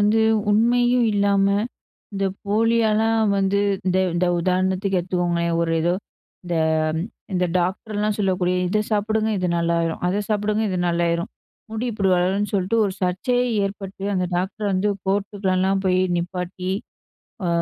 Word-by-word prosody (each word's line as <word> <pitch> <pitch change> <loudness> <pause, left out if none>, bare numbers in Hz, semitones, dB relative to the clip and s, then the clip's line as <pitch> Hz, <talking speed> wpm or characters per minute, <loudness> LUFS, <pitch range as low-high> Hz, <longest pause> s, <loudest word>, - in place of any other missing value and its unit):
வந்து 210 +2 +3 0.3
உண்மையும் 240 +2 +3
இல்லாம 200 -1 +2 0.7
இந்த 195 0 0 0.2
போலியால 220 +1 +2 0.4
வந்து 195 +1 +1 0.3
இந்த 185 0 +2 0.2
இந்த 175 +1 +1
உதாரணத்துக்கு 185 +2 +1
எடுத்துக்கோங்களேன், 175 -1 -1
ஒரு 165 -1 0
ஏதோ 175 +2 +1 0.5
இந்த 175 -1 -1 0.8
இந்த 180 0 +2
டாக்டர்லாம் 205 +3 -1
சொல்லக்கூடிய, 185 -2 +1
"இத 215 - +1
சாப்பிடுங்க 215 +1 +1
இது 180 - 0
நல்லாயிரும், 170 -1 0
அத 195 +3 0
சாப்பிடுங்க 210 0 0
இது 185 - -1
நல்லாயிரும், 170 +1 0 0.4
முடி 225 +3 -3
இப்டி 200 -2 0
வளரும்னு" 190 +4 0
சொல்ட்டு 195 +3 +1
ஒரு 195 - -1
சர்ச்சையே 245 +8 +1 0.2
ஏற்பட்டு. 195 -1 -7
அந்த 185 -1 0
டாக்டர 190 +4 -3
வந்து 190 +2 +1 0.2
கோர்ட்டுக்குல்லாம் 195 -1 0
போய் 185 0 +3 0.2
நிப்பாட்டி, 180 +1 -4 0.8
ஆ - - 0
195 Hz, 130 wpm, -22 LUFS, 180-210 Hz, 0.8 s, வந்து